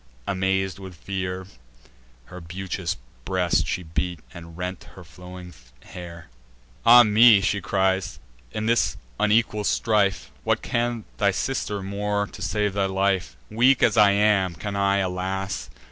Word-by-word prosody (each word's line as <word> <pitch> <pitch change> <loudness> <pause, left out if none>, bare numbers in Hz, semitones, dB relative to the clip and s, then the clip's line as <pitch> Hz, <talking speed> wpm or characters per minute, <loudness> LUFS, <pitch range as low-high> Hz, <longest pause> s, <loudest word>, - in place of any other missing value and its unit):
Amaz'd 95 0 -1
with 95 -2 -9
fear, 95 +1 -4 0.8
Her 90 +6 -10
beauteous 90 +1 -4 0.3
breast 90 0 0
she 90 - -2
beat, 85 +1 -3
and 85 -1 -11
rent 90 0 -5
her - - -11
flowing 90 0 -11 0.3
hair. 85 -2 -10 0.6
"Ah 120 +1 +9
me!" 110 0 +6
she 100 0 0
cries, 95 -1 0 0.3
"in 110 - -3
this 115 +1 +1 0.2
unequal 105 0 +2
strife 105 -3 +1
What - - 0
can 120 -2 -1
thy 100 - +3
sister 100 -1 -2
more 100 +1 -1
to 105 - -12
save 105 -1 -1
thy 100 -1 0
life? 95 -9 -1
Weak 125 +4 +4
as 120 -3 +4
I 105 -2 +6
am, 100 -4 +2
can 100 +6 -5
I, 100 0 +2
alas! 95 +1 -3
95 Hz, 140 wpm, -24 LUFS, 90-105 Hz, 0.8 s, Ah